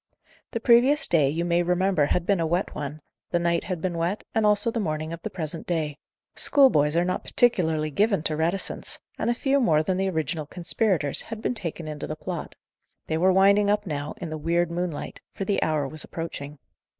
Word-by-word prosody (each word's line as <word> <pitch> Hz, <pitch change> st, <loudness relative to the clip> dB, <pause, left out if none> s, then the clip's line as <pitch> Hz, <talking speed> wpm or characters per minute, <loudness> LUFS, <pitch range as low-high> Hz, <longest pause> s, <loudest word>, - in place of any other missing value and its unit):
The 230 Hz, -, -3 dB
previous 250 Hz, +6 st, +5 dB
day, 150 Hz, -5 st, +3 dB
you 165 Hz, +4 st, -1 dB
may 175 Hz, 0 st, +2 dB
remember, 180 Hz, -3 st, +2 dB
had 175 Hz, +2 st, 0 dB
been 200 Hz, -1 st, +2 dB
a 165 Hz, -, +1 dB
wet 175 Hz, +4 st, -1 dB
one, 150 Hz, +1 st, -6 dB, 0.3 s
the -, -, +1 dB
night 170 Hz, 0 st, 0 dB
had 180 Hz, -3 st, -4 dB
been 175 Hz, -2 st, -2 dB
wet, 175 Hz, +5 st, -1 dB
and 220 Hz, -1 st, +3 dB
also 210 Hz, +2 st, +3 dB
the 230 Hz, -, -2 dB
morning 155 Hz, -4 st, -2 dB
of 165 Hz, -, -7 dB
the -, -, -4 dB
present 160 Hz, -2 st, -5 dB
day. 155 Hz, -4 st, -1 dB, 0.4 s
Schoolboys 165 Hz, -, +4 dB
are 175 Hz, -, +3 dB
not 185 Hz, -, -2 dB
particularly 160 Hz, -10 st, +1 dB
given 200 Hz, +1 st, +1 dB
to 155 Hz, -, -1 dB
reticence, 170 Hz, +5 st, -2 dB, 0.2 s
and -, -, 0 dB
a 240 Hz, -, +1 dB
few 275 Hz, +3 st, +1 dB
more 155 Hz, -, +3 dB
than 185 Hz, +3 st, -1 dB
the 190 Hz, 0 st, 0 dB
original 160 Hz, -2 st, -2 dB
conspirators 175 Hz, -3 st, +1 dB
had 225 Hz, -1 st, -7 dB
been 235 Hz, -, -1 dB
taken 170 Hz, -7 st, -5 dB
into 150 Hz, -1 st, -5 dB
the 155 Hz, -, -4 dB
plot. 175 Hz, +1 st, -6 dB, 0.5 s
They 160 Hz, -, -1 dB
were 185 Hz, +2 st, +4 dB
winding 200 Hz, +2 st, +4 dB
up 210 Hz, 0 st, +1 dB
now, 145 Hz, -3 st, -4 dB
in 170 Hz, -3 st, -6 dB
the 155 Hz, -, -4 dB
weird 170 Hz, +2 st, +1 dB
moonlight, 175 Hz, -3 st, -4 dB
for 195 Hz, -, -5 dB
the 200 Hz, 0 st, 0 dB
hour 155 Hz, -3 st, 0 dB
was 155 Hz, +3 st, -7 dB
approaching. 150 Hz, -3 st, -6 dB
170 Hz, 210 wpm, -25 LUFS, 155-195 Hz, 0.5 s, previous